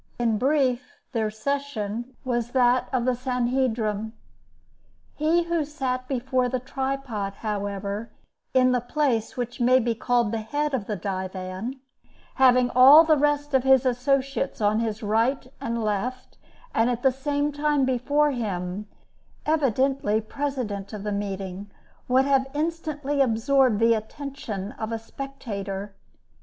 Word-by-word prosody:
In 230 -3 +1
brief, 265 -2 +1
their 220 -3 0
session 240 -1 -3
was 240 -1 -1
that 250 -1 +3
of 250 -3 0
the 255 - +3
Sanhedrim. 240 -4 -1 1.0
He 320 +3 +2
who 335 -2 0
sat 260 -4 -3
before 255 -1 0
the 255 0 -1
tripod, 265 -6 -3
however, 205 0 -3 0.4
in 255 -1 +4
the 250 -1 +1
place 245 -3 -1
which 245 0 -4
may 250 +2 +5
be 240 -2 +1
called 240 -1 +1
the 225 -1 -2
head 290 +7 -2
of 230 -7 -2
the 210 - -2
divan, 190 +5 -4 0.6
having 250 -1 +5
all 275 +6 +9
the 315 -1 +4
rest 290 0 +1
of 265 -2 +3
his 265 -1 +5
associates 275 +2 0
on 210 0 +2
his 220 -1 -2
right 230 +6 +1 0.2
and 230 0 -2
left, 240 +5 -3 0.3
and, 225 +2 +3
at 245 -1 -2
the 265 - +5
same 285 +2 -1
time, 290 -1 +1
before 285 +4 +2
him, 200 -4 -3 0.6
evidently 270 -6 +1
president 220 -5 -4
of 205 -2 -6
the 210 - -2
meeting, 195 -1 -4 0.4
would 260 +2 +4
have 270 -1 +2
instantly 300 -3 -1
absorbed 250 -1 +3
the 230 0 +5
attention 220 -3 -5
of 220 +1 -3
a 225 - -1
spectator. 210 -6 -6
250 Hz, 140 wpm, -25 LUFS, 215-275 Hz, 1.0 s, all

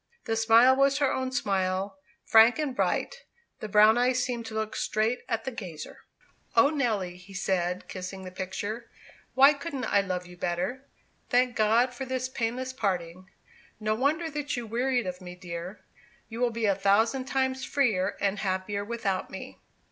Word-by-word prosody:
The 225 - 0
smile 225 +3 +6
was 275 +1 +3
her 280 -2 +2
own 260 0 -2
smile, 195 -1 -1 0.3
frank 225 +2 +6
and 295 -4 -2
bright; - - 0 0.4
the 215 - -6
brown 215 +3 +6
eyes 250 0 +2
seemed 240 -3 -3
to 220 - -7
look 220 0 -2
straight 220 +3 0
at 225 -2 -1
the 265 - -4
gazer. 180 -10 -8 0.6
"O 280 - +6
Nelly," 215 - -1
he 190 +2 -14
said, 180 -1 -1
kissing 190 +1 -7
the 185 - -8
picture, 205 +5 -5 0.5
"why 275 +3 +7
couldn't 280 -3 -5
I 200 - +3
love 185 -2 -3
you 180 0 -12
better? 185 +11 -3 0.4
Thank 250 0 +2
God 230 +4 +3
for 265 +2 -5
this 255 0 -2
painless 255 +2 -3
parting! 185 -5 -3 0.5
No 215 0 0
wonder 290 +8 0
that 290 -2 -3
you 240 - -4
wearied 245 +1 0
of 180 0 -5
me, 180 -1 -9
dear; 180 +2 -8 0.4
you 225 0 -7
will 245 -1 +2
be 230 -1 -2
a 200 - +4
thousand 220 +7 +2
times 265 -1 -1
freer 215 -10 +1
and 200 0 0
happier 195 +1 -2
without 210 -4 -2
me." - - -9
225 Hz, 170 wpm, -28 LUFS, 190-255 Hz, 0.6 s, why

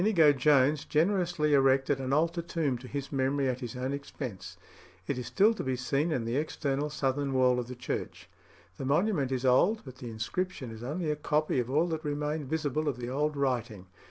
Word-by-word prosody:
Inigo 175 -7 +5
Jones 140 +1 +3
generously 170 -2 +1
erected 135 0 +3
an 130 0 -3
altar 165 +4 +1
tomb 165 -5 -1
to 130 - -10
his 140 +1 -5
memory 135 0 +1
at 130 -1 -1
his 125 -1 -6
own 130 +2 -2
expense; 100 - -7 0.5
it 130 +4 -2
is 125 - -5
still 210 +3 +4
to 220 - -5
be 130 -1 -1
seen 140 +6 0
in 125 -7 -1
the 115 +3 -1
external 145 -1 -1
southern 140 -1 -1
wall 125 -1 +3
of 120 - -4
the 125 - -7
church. 125 - -5 0.5
The 135 - -5
monument 145 -1 +1
is 130 0 -1
old; 175 - +4
but 130 -2 -10
the 120 - -7
inscription 130 +4 -3
is 110 0 -9
only 155 +6 -2
a - - 0
copy 150 -1 0
of 120 0 -2
all 150 +5 +3
that 160 -1 -3
remained 150 -1 -2
visible 155 -1 -1
of 140 -4 -1
the 120 0 -5
old 150 +3 -1
writing. 120 -8 -1
140 Hz, 205 wpm, -29 LUFS, 130-155 Hz, 0.5 s, Inigo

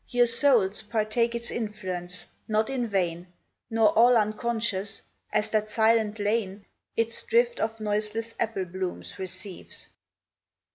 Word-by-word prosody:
Your 245 0 +4
souls 230 -5 +3
partake 220 +2 0
its 235 0 -3
influence, 185 -5 -5 0.2
not 215 +3 +1
in 250 -3 -1
vain 180 -4 -1 0.4
Nor 225 -2 +4
all 235 +3 +6
unconscious, 215 -2 -1 0.3
as 210 0 0
that 215 -1 +1
silent 220 0 +3
lane 205 -1 -1 0.3
Its 230 0 0
drift 480 +1 +2
of 225 0 -1
noiseless 215 +2 -2
apple 220 -5 -1
blooms 185 +2 -5
receives. 185 0 -7
215 Hz, 125 wpm, -27 LUFS, 200-230 Hz, 0.4 s, all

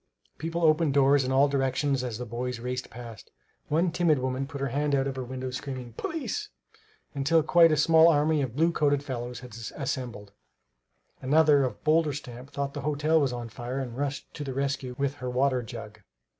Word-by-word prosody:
People 165 +1 -3
opened 155 -2 +3
doors 140 0 +5
in 130 - -2
all 135 +2 +5
directions 135 0 0
as 120 -4 -4
the 125 - -5
boys 120 +1 -4
raced 125 +1 -4
past. 115 -3 -10 0.4
One 165 +3 +1
timid 170 -3 +2
woman 130 +1 -2
put 140 0 -7
her 140 0 -1
head 145 +2 0
out 135 -1 +1
of 135 -1 -3
her 130 - -4
window, 130 +1 -5
screaming, 130 -2 -6
"Police!" 325 - -4 0.6
until 150 +3 +2
quite 165 +1 +6
a 155 - +2
small 160 +2 +6
army 155 -1 +3
of 125 -4 -3
blue 165 +3 +3
coated 145 -3 +1
fellows 125 -3 -5
had 125 -4 -11 0.2
assembled. 125 -7 -4 0.9
Another 145 +1 +4
of 125 -5 -4
bolder 155 -1 +3
stamp 125 -2 -8
thought 140 0 -3
the 145 - -5
hotel 150 +3 +2
was 135 -3 +1
on 120 -1 -5
fire 120 +3 -5
and 125 -4 -4
rushed 140 +1 -4
to 150 - -6
the 135 -2 -5
rescue 135 -2 -2
with 140 0 -1
her 125 -2 -4
water 130 0 +1
jug. 115 -3 -9
135 Hz, 195 wpm, -27 LUFS, 125-150 Hz, 0.9 s, quite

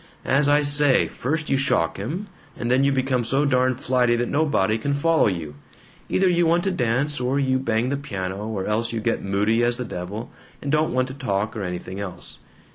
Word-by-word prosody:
As 140 +2 +3
I 145 +1 +4
say, 145 -2 +4
first 155 +4 -3
you 135 - +3
shock 135 - 0
him, 155 - -4 0.3
and 120 - -2
then 130 +2 +3
you 140 - +3
become 130 -2 0
so 135 +5 +1
darn 130 -2 +2
flighty 125 -2 +1
that 120 0 -1
nobody 140 -9 +1
can 140 +4 -1
follow 160 0 +3
you. 85 -6 -3 0.6
Either 190 - +2
you 175 -1 +3
want 170 +1 +2
to 195 - 0
dance, 135 0 0
or 130 +3 0
you 130 -1 +1
bang 115 -1 0
the 140 - -1
piano, 100 -6 -5
or 100 -4 -3
else 115 +2 0
you 115 - -2
get 110 - -1
moody 105 +4 +1
as 120 0 +2
the 125 - -4
devil 100 +4 -6 0.3
and 140 - -4
don't 155 +1 +2
want 130 0 +1
to - - -6
talk 105 -5 -2
or 110 - -4
anything 90 +1 -5
else. 90 -3 -7
125 Hz, 210 wpm, -23 LUFS, 110-140 Hz, 0.6 s, I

